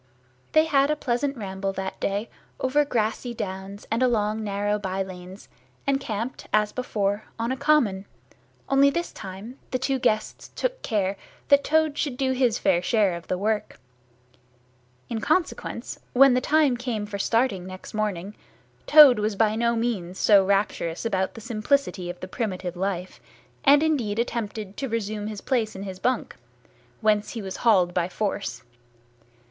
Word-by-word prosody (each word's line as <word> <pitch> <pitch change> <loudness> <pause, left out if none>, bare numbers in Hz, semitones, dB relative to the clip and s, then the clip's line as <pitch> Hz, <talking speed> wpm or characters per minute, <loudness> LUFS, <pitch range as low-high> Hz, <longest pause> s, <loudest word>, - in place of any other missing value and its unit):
They 310 0 +5
had 280 -3 +3
a 300 - +2
pleasant 275 0 -1
ramble 195 -2 -3
that 190 0 -5
day 200 +3 -1 0.3
over 275 +3 +2
grassy 235 -1 -1
downs 195 0 -6
and 230 +2 +1
along 220 -3 +1
narrow 205 0 -1
by 195 -1 -2
lanes, 185 +1 -10 0.4
and 275 -1 +2
camped 230 0 -5
as 210 0 +2
before, 210 -4 -2
on 230 +2 -1
a - - 0
common, 260 -9 +2 0.6
only 275 +1 +5
this 340 +4 -2
time 200 +6 -9
the 255 - 0
two 265 +1 -1
guests 215 -3 -1
took - - -2
care 200 -3 -1 0.3
that 280 0 +6
Toad 315 -1 +2
should 270 -5 -1
do 265 -1 +1
his 250 -4 +2
fair 180 -3 +2
share 205 -1 +2
of 170 0 -10
work. 210 +4 -1 1.3
In 225 -2 -3
consequence, 325 +7 -1
when 270 +1 +7
the 250 - +2
time 295 -4 +3
came 235 -4 -3
for 205 -1 -6
starting 225 -4 +1
next 185 0 -9
morning, 205 -3 -2 0.5
Toad 290 -6 +9
was 210 0 0
by 215 +1 +2
no 235 +1 +1
means 205 -6 -2
so 200 -3 +5
rapturous 195 -3 0
about 190 -4 -1
the 225 - -9
simplicity 220 -4 0
of 175 0 -7
the 185 - -5
primitive 185 -4 -3
life, 185 0 -3 0.4
and 285 +2 +6
indeed 250 -10 0
attempted 215 -4 -3
to 270 - -3
resume 215 -2 -3
his 215 -2 -6
place 230 -5 0
in 190 - -6
his 190 -2 -7
bunk, 250 - -1 0.6
whence 215 -1 +2
he 230 - -4
was 190 -1 -5
hauled 185 -7 +3
by 175 0 0
force. 195 - -3
215 Hz, 160 wpm, -25 LUFS, 195-255 Hz, 1.3 s, Toad